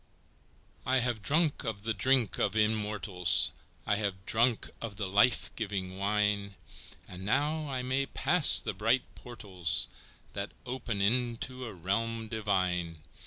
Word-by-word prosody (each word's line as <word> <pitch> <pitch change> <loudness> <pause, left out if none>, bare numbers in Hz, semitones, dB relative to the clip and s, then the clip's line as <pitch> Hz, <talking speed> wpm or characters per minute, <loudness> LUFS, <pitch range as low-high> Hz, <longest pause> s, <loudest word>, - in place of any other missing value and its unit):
VI. 130 - -2
I - - +4
have 120 -3 -1
drunk 155 +5 +1
of 110 -4 -4
the 115 0 -1
drink 125 +2 +1
of - - 0
immortals, 105 -5 +2 0.3
I 105 - +1
have 100 -3 -3
drunk 115 +1 +1
of 110 -3 -5
the 105 0 -3
life 105 +6 +2
giving 95 -4 -4
wine, 100 0 0 0.5
And 90 +1 -9
now 150 +8 -1
I 130 -2 -3
may 130 +2 -1
pass 155 +4 +6
the - - -3
bright 115 +6 +1
portals 100 -9 -1 0.4
That 100 0 -5
open 120 -5 -3
into 125 +3 -1
a 115 - -7
realm 110 +5 -3
divine! 90 -7 -2
110 Hz, 140 wpm, -30 LUFS, 100-125 Hz, 0.5 s, pass